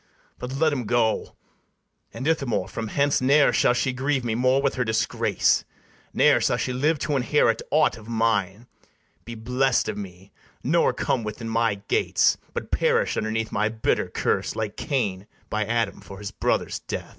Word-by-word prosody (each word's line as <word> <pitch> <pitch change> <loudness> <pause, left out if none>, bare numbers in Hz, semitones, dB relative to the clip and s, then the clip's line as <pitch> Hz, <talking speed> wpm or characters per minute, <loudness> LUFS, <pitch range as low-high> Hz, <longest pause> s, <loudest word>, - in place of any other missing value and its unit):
But 125 +1 -6
let 155 +2 +2
'em 130 -4 -3
go: 115 0 0 0.8
and, 135 - -5
Ithamore, 140 -8 0
from 115 -1 -5
hence 140 +5 +1
Ne'er 140 +3 +4
shall 120 - +3
she 130 +1 0
grieve 130 0 -1
me 115 - 0
more 130 +3 +2
with 140 -1 +1
her 125 - -1
disgrace; 110 -1 +1 0.5
Ne'er - - +4
shall - - +1
she 125 - -2
live 150 +5 +1
to 150 - -1
inherit 125 -3 +2
aught 155 -5 +2
of 110 - -14
mine, 110 -2 0 0.6
Be 115 +1 -7
bless'd 125 +3 +1
of 105 -1 -4
me, 95 -1 -10 0.3
nor - - +3
come 120 - -1
within 110 +2 -5
my 115 -2 +1
gates, - - +2 0.2
But - - -5
perish - - +1
underneath 110 +1 -2
my 105 +2 +1
bitter 110 0 0
curse, - - -1
Like 110 -2 -3
Cain 105 -10 -2 0.2
by 105 0 0
Adam 115 -1 -1
for 100 - -11
his 100 0 -6
brother's - - -1
death. - - -6
115 Hz, 170 wpm, -24 LUFS, 110-130 Hz, 0.8 s, Ne'er